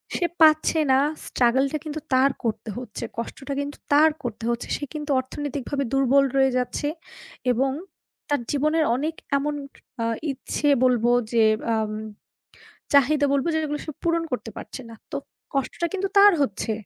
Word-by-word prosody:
সে 355 - +1 0.2
পাচ্ছে 310 +1 +5
না 265 - +5 0.3
স্ট্রাগলটা 265 +4 +2
কিন্তু 310 0 -4
তার 265 +2 +5
করতে 225 -1 -2
হচ্ছে, 245 -4 -7
কষ্টটা 270 +4 -5
কিন্তু 285 +1 -6 0.2
তার 305 +2 +7
করতে 230 -1 -5
হচ্ছে। 235 0 -2
সে - - -8
কিন্তু 300 -1 -4
অর্থনৈতিকভাবে 280 +1 -3
দুর্বল 270 +1 +4
রয়ে 265 0 +4
যাচ্ছে 250 +3 -1 0.6
এবং 265 +3 +1 0.6
তার 290 -3 +1
জীবনের 305 +2 +2
অনেক 310 +5 -2 0.2
এমন 295 +1 -1 0.4
অ্যা 230 - -1 0.3
ইচ্ছে 275 +2 -3 0.2
বলবো 240 -2 +3 0.2
যে 230 -1 +5 0.2
অ্যাম 220 -2 0 1.0
চাহিদা 285 +1 +5
বলবো 280 +2 +1
যেগুলো 300 -2 -1
সে 310 - -4
পূরণ 335 0 +1
করতে 240 -2 -3
পারছে - - -8
না। 230 - -10 0.2
তো - - -2 0.4
কষ্টটা 275 +5 -1
কিন্তু 390 0 -1
তার 405 +1 +9
হচ্ছে। 225 -3 -1
275 Hz, 150 wpm, -24 LUFS, 250-300 Hz, 1.0 s, তার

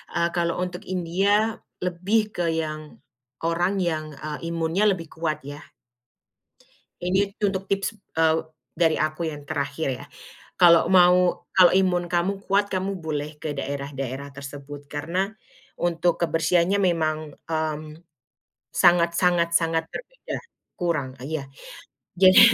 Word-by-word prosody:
eee, 170 0 +2
kalau 170 -1 0
untuk 180 0 -5
India 195 +5 +1 0.3
lebih 195 +5 +1
ke 175 - 0
yang 155 -1 -4 0.4
orang 175 +4 +1
yang, 155 -3 -1
eee, 150 +3 -5
imunnya 165 +4 0
lebih 170 -4 -4
kuat, 160 -1 -2
ya. 145 +1 -7 1.4
Ini 190 +3 +1
untuk 195 -2 0
tips, 195 +3 -1 0.2
eee, 160 0 +4 0.4
dari 165 -2 +3
aku 155 +2 -1
yang 145 -2 -9
terakhir 140 0 -2
ya, - - -10 0.5
kalau 170 -2 +7
mau 180 -1 +5
kalau 185 -2 +7
imun 185 -2 +2
kamu 185 +3 0
kuat, 200 +1 +2
kamu 190 +1 -1
boleh 150 -1 -4
ke 155 - -3
daerah-daerah 140 -1 -4
tersebut 140 +1 -9
karena 170 +8 -2 0.4
untuk 175 0 +1
kebersihannya 170 +3 +2
memang, 165 -4 +2 0.3
mmm, 155 -1 -1 0.9
sangat 170 -1 +4
sangat 175 -2 +3
sangat 165 -1 +2
berbeda, - - -7 0.4
kurang 170 -7 -1 0.2
iya, 150 -1 -4 0.7
jadi 185 +1 +8
170 Hz, 120 wpm, -24 LUFS, 155-185 Hz, 1.4 s, jadi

